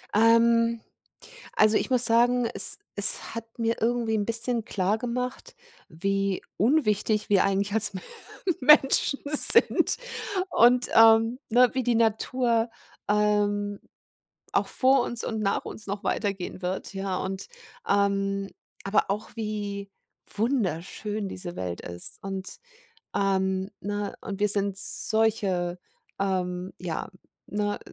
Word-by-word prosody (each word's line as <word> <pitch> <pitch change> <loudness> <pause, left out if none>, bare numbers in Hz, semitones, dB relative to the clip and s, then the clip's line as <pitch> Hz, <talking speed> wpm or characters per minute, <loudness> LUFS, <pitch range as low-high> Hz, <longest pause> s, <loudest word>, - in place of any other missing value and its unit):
Ähm, 230 +1 +3 0.7
also, 215 0 +3
ich - - -1
muss 250 -1 +7
sagen, 240 +1 +4
es - - +3 0.2
es 205 +1 +1
hat 230 0 -9
mir 230 0 -2
irgendwie 230 -1 -1
'n 205 - -1
bisschen 230 0 +1
klargemacht, 235 +7 -3 0.3
wie 195 +3 -2
unwichtig 215 - 0
wir 195 -2 +3
eigentlich 195 +1 -1
als 215 -2 +3 0.7
Menschen 275 0 +4
sind 295 0 +7 0.5
und, 245 -1 +4
ähm, 225 +1 +5
ne, 245 +1 +4
wie 260 - -1
die 245 -1 0
Natur, 230 +1 0 0.4
ähm, 205 -1 0 0.7
auch - - 0
vor 265 0 +2
uns 240 -1 0
und 220 - -4
nach 200 -1 -1
uns 215 - -7
noch 200 0 -5
weitergehen 195 -4 -4
wird, 185 +3 -4
ja 195 -1 -3
und, 190 0 -5 0.4
ähm 195 -1 0 0.3
aber 195 +1 +1
auch 210 +2 -4
wie 205 -2 -5 0.4
wunderschön 210 - -3
diese 180 -2 -7
Welt 90 -1 -6
ist 85 0 -5
und 195 - -6 0.6
ähm, 190 0 -1
ne 205 +1 -5
und 195 -1 -7
wir 210 - +2
sind 200 -1 -1
solche, 195 -5 0 0.4
ähm 185 -1 -3
ja, 175 -3 -5 0.4
ne? 205 0 -3
210 Hz, 120 wpm, -25 LUFS, 195-230 Hz, 0.7 s, muss